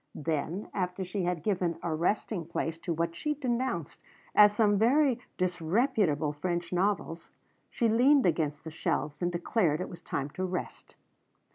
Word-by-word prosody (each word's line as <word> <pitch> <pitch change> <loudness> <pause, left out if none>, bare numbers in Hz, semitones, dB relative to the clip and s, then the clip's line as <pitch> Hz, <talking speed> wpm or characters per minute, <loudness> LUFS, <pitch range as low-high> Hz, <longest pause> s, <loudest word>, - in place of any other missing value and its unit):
Then 160 +5 -2
after 180 0 -2
she 185 0 -3
had 175 -3 -2
given 180 -5 0
a 170 - -1
resting 175 +2 -1
place 165 -1 -3
to 170 - -4
what 165 +1 -1
she 300 - -2
denounced 245 - -2 0.3
as 210 0 +8
some 210 -1 +3
very 255 +2 +4 0.2
disreputable 180 - +1
French 170 +3 -3
novels, 180 -3 -1 0.4
she 235 - +1
leaned 255 +5 +5
against 150 -4 0
the 160 - -7
shelves 150 -1 -2
and 175 0 +1
declared 170 -2 +1
it 180 - -4
was 175 - -10
time 140 +1 -3
to 185 - -4
rest. 185 -1 -5
180 Hz, 155 wpm, -29 LUFS, 165-210 Hz, 0.4 s, as